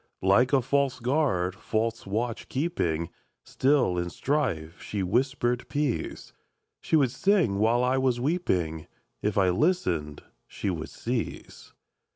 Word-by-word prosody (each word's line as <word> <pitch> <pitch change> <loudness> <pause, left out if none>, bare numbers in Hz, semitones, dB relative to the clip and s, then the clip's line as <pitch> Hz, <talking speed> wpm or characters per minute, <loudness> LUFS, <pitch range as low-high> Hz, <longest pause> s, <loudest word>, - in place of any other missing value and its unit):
Like 110 +7 +4
a 135 -3 +3
false 135 0 +1
guard, 120 - +1
false 115 +1 -2
watch 115 +3 -3
keeping, 90 - -1 0.3
Still, 130 -10 +2
in 85 0 -2
strife, 95 - -2
she 100 -2 -3
whispered 120 +4 0
peace; 145 -4 -2 0.5
She - - 0
would 135 -6 +4
sing 160 - +2
while 115 +3 +3
I 130 +1 +2
was 130 -2 +1
weeping; 90 - -1 0.3
If 105 0 -1
I 95 -2 +4
listened, 90 - 0 0.2
she 100 - -3
would 80 -3 -5
cease. 120 -1 -5
120 Hz, 130 wpm, -27 LUFS, 95-135 Hz, 0.5 s, Like